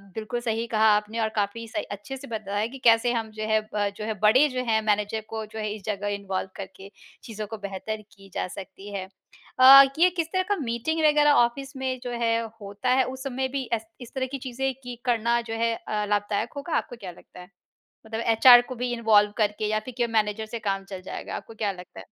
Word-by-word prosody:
बिल्कुल 220 +2 -3
सही 230 0 -2
कहा 220 0 +5
आपने 210 +2 -2
और 220 -1 +1
काफ़ी 210 +3 -2
सही 310 +7 -3
अच्छे 205 +7 -6
से 275 - -10
बताया 215 -1 -2
कि 270 +3 -10
कैसे 230 +1 +5
हम 225 -2 -2
जो 215 0 -6
है 220 0 +3 0.2
अ, 205 -1 +1
जो 205 +1 -7
है 220 - -1
बड़े 240 +8 +5
जो 255 0 -2
हैं 220 -1 +2
मैनेजर 210 +1 0
को 220 -1 -4
जो 220 +1 -9
है 215 -1 -2
इस 210 - -12
जगह 205 -1 -2
इन्वॉल्व 190 -1 -4
करके, 195 0 -9 0.3
चीज़ों 215 -2 -6
को 220 +1 -6
बेहतर 205 +2 -5
की 195 -1 -16
जा - - -2
सकती 195 +2 -10
है। 190 -1 -3 0.5
अ, 270 +2 +11 0.2
ये 365 +1 +6
किस 335 -3 -2
तरह 370 0 +2
का 410 - +3
मीटिंग 285 +2 -2
वग़ैरह 295 -1 +5
ऑफिस 270 +3 -7
में 260 -1 -2
जो 245 - -4
है 230 0 +2 0.2
होता 205 +5 -4
है 260 - +4
उस 260 +1 -6
समय 265 -1 -2
भी 260 - -4
ए 225 - +2 0.2
इस 240 - -10
तरह 260 - 0
की 275 - -3
चीज़ें 265 +1 -2
कि 245 -1 -6
करना 235 -1 +2
जो - - -2
है 230 0 +2 0.3
लाभदायक 205 0 -1
होगा 300 +4 -5
आपको 245 - -4
क्या 195 -6 -8
लगता 175 - -16
है? 180 +1 -12 0.6
मतलब 220 +1 -4
एचआर 245 +2 +9
को 255 - -5
भी 245 +1 -2
इन्वॉल्व 215 -3 +4
करके 210 0 0
या 215 0 +1
फिर 255 - -7
केवल 240 -2 0
मैनेजर 215 0 +1
से 230 +1 -6
काम 195 -2 -2
चल 190 -2 -6
जाएगा। - - -6
आपको 225 - -8
क्या 210 -2 -1
लगता 180 -1 -11
है? - - -10
220 Hz, 230 wpm, -26 LUFS, 205-250 Hz, 0.6 s, अ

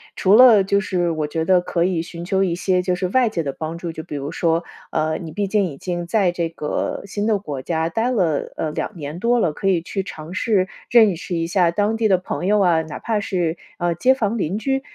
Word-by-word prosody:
除 190 - +3
了 230 -3 +8
就 200 +1 +2
是 175 -3 0
我 155 -2 -2
觉 160 +2 -2
得 180 0 +4
可 175 -1 -1
以 175 -2 0
寻 170 0 -8
求 190 +2 +1
一 175 -2 0
些 180 0 +1
就 180 0 0
是 180 +1 -2
外 250 +3 +3
界 170 -7 -2
的 140 - -3
帮 160 +3 -5
助， 170 0 -5
就 160 - -7
比 155 -2 -8
如 140 +1 -4
说 165 0 0 0.3
呃， 155 0 0
你 160 -2 -7
毕 205 0 -1
竟 205 0 +2
已 150 -6 -6
经 175 +2 -4
在 190 -2 +2
这 170 -2 -2
个 150 -2 -3
新 205 +2 -3
的 215 -2 +3
国 145 -9 -6
家 160 +2 -1
待 225 +8 -1
了， 180 - 0
呃， 155 - -2
2 185 +5 -4
年 150 +2 -6
多 240 +4 +2
了， 165 -8 +1
可 195 - -3
以 185 -3 +3
去 195 +2 -3
尝 160 -3 -9
试 190 -1 +1 0.2
认 220 -6 +5
识 175 +1 -5
一 165 0 0
下 175 0 +2
当 205 +5 0
地 225 -1 +2
的 190 -3 +4
朋 185 0 -4
友 210 +1 +3
啊， 175 -4 +3
哪 155 -2 -7
怕 220 -2 -1
是， 175 -5 -1 0.2
呃， 175 -1 0
街 255 +10 +3
坊 230 -2 -1
邻 185 +2 -1
居。 270 +4 -1
180 Hz, 265 characters per minute, -21 LUFS, 165-205 Hz, 0.3 s, 了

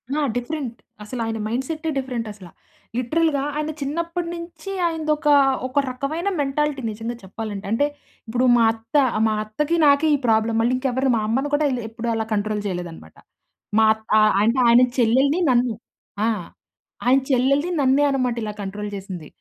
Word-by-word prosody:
ఆ! - - +1 0.2
డిఫరెంట్. 245 -1 -4 0.3
అసలాయన 225 0 -3
మైండ్‌సెట్టే, 305 +8 -3
డిఫరెంటసల 225 -8 -5 0.5
లిటరల్‌గా 285 +4 +1
ఆయన 305 +1 -2
చిన్నప్పడి 335 +4 -2
నించి 335 +2 -8 0.2
ఆయనదొక, 310 -2 -1 0.4
ఒక 275 +3 0
రకమైన 305 +9 -2
మెంటాలిటీ 285 0 -1
నిజంగా 225 +3 -5
చెప్పాలంటే, 205 +1 -6
అంటే 285 +6 +2 0.4
ఇప్పుడు 245 +3 +1
మా 230 - +4
అత్త, 225 +4 -14 0.3
మా 220 - +1
అత్తకి 300 +10 -1
నాకే 285 +2 +5
ఈ - - 0
ప్రాబ్లమ్ 225 0 +2
మళ్ళీ 240 +2 +2
ఇంకెవరిని 260 0 0
మా - - 0
అమ్మని 265 +6 0
కూడా 295 +1 +3
ఇలా 245 -1 -2
ఎప్పుడు 230 +1 -4
అలా 225 -1 -1
కంట్రోల్ 210 0 -1
చేయలేదనమాట. 175 - -7 0.6
మా 220 - +6
అత్ 220 0 -17
ఆహ్, 215 0 +4
అంటే 230 +4 +2
ఆయన 235 +1 +7 0.2
చెల్లెల్ని, 265 +7 +3
నన్ను. 245 -1 +2 0.5
ఆ! - - +2 0.8
ఆయన 260 +2 +5
చెల్లెల్ని 275 +7 +2
నన్నే 270 +2 +3
అనమాట. 255 -3 0
ఇలా 210 - -4
కంట్రోల్ 205 +1 -5
చేసింది. 185 -5 -7
250 Hz, 150 wpm, -22 LUFS, 220-290 Hz, 0.8 s, ఆయన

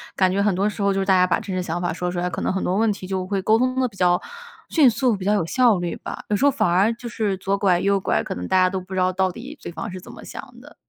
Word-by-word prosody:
感 185 -1 +3
觉 195 +2 +1
很 205 -1 +2
多 195 +3 +1
时 210 - -7
候， 200 0 +2
就 195 - -1
是 195 - 0
大 190 -1 +4
家 180 0 +5
把 180 - +1
真 190 - -5
实 185 - -1
想 175 0 -3
法 175 - -1
说 180 +2 -3
出 175 - -3
来， 180 +1 -1
可 - - -5
能 - - 0
很 190 - -2
多 180 - 0
问 225 0 +3
题 190 -2 -9
就 190 -1 -2
会 195 0 -2
沟 215 +4 +3
通 255 +2 0
得 255 - +2
比 210 -5 -15
较 180 -1 +3 0.5
迅 305 -5 +5
速， 240 0 +2
比 190 - -7
较 205 - +3
有 205 - +1
效 240 +3 +3
率 175 -1 -3
吧。 - - -7
有 210 - +2
时 275 - +1
候 285 - +5
反 210 - +1
而 195 +6 +3
就 235 +1 -8
是 210 -3 -1
左 195 +1 -1
拐 190 -3 +2
右 200 +1 +2
拐， - - 0
可 - - -5
能 90 0 -5
大 - - +2
家 185 - +4
都 190 - -3
不 185 +1 -10
知 190 - -1
道 185 0 +2
到 185 0 0
底 265 - -10
对 - - -6
方 170 +6 -6
是 185 - -7
怎 - - -12
么 - - -12
想 - - -8 0.2
的。 - - -15
195 Hz, 370 characters per minute, -22 LUFS, 185-215 Hz, 0.5 s, 家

